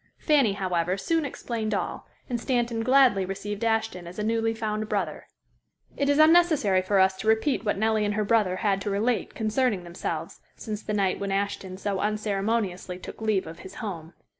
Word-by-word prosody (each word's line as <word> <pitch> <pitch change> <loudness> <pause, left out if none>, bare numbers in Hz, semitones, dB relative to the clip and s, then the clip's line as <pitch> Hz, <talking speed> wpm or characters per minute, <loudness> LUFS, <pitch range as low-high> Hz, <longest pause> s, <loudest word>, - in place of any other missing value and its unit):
Fanny, 280 - +3
however, 185 -2 -1
soon 325 +9 0
explained 225 -5 -3
all, - - -4 0.2
and 240 -3 -3
Stanton 240 -3 0
gladly 255 -5 +4
received 200 +3 -5
Ashton 220 -6 0
as 175 - -10
a 210 - -2
newly 225 +1 +1
found 215 -1 -3
brother. - - -2 0.7
It 280 0 0
is 285 - +3
unnecessary 310 - +5
for 195 +1 +1
us 190 0 +4
to 215 - -5
repeat 220 +6 +2
what 205 - 0
Nellie 220 +1 +2
and 205 0 0
her 215 0 0
brother 210 -4 +2
had 195 0 0
to 205 - -2
relate 220 +4 0
concerning 220 -3 0
themselves 175 +1 -5 0.2
since 215 -2 -5
the 210 - -4
night 195 -2 +1
when 200 -1 -3
Ashton 195 -1 -2
so 195 0 -2
unceremoniously 205 -3 -1
took 185 - -10
leave 215 -3 +1
of 165 +1 -9
his 190 - -11
home. 175 -7 -6
210 Hz, 185 wpm, -26 LUFS, 195-230 Hz, 0.7 s, unnecessary